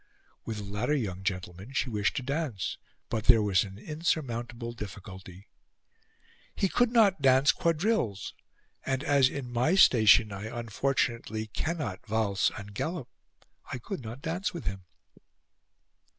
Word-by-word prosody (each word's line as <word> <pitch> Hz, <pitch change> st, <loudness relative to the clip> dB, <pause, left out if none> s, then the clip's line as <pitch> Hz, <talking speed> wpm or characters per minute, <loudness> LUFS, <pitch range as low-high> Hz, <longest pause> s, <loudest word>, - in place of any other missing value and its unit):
With 110 Hz, -, -4 dB
the 105 Hz, -, -5 dB
latter 105 Hz, +8 st, -1 dB
young 95 Hz, -9 st, -3 dB
gentleman 95 Hz, +3 st, -4 dB
she 135 Hz, -, 0 dB
wished 105 Hz, -2 st, 0 dB
to 130 Hz, -, -2 dB
dance, 140 Hz, -, -3 dB, 0.3 s
but 110 Hz, -2 st, -3 dB
there 115 Hz, -4 st, +6 dB
was 95 Hz, -4 st, +3 dB
an 95 Hz, -1 st, -9 dB
insurmountable 120 Hz, -5 st, -3 dB
difficulty. 95 Hz, -3 st, -9 dB, 1.1 s
"He 195 Hz, -, +2 dB
could 245 Hz, +4 st, +3 dB
not 205 Hz, -8 st, +4 dB
dance 135 Hz, +1 st, +5 dB
quadrilles, 165 Hz, -, 0 dB, 0.5 s
and, 135 Hz, +1 st, -1 dB
as 140 Hz, -3 st, +4 dB
in 130 Hz, -3 st, -6 dB
my 125 Hz, +9 st, +2 dB
station 110 Hz, -, +6 dB
I 100 Hz, +2 st, -6 dB
unfortunately 115 Hz, -1 st, -1 dB
cannot 150 Hz, -, -3 dB
valse 105 Hz, -3 st, +1 dB
and 105 Hz, -1 st, -9 dB
gallop, 160 Hz, -, -3 dB, 0.6 s
I -, -, -3 dB
could 135 Hz, +7 st, -6 dB
not 120 Hz, +4 st, -8 dB
dance 175 Hz, +4 st, -2 dB
with 170 Hz, -, -6 dB
him." 95 Hz, -2 st, -4 dB
120 Hz, 135 wpm, -29 LUFS, 105-145 Hz, 1.1 s, there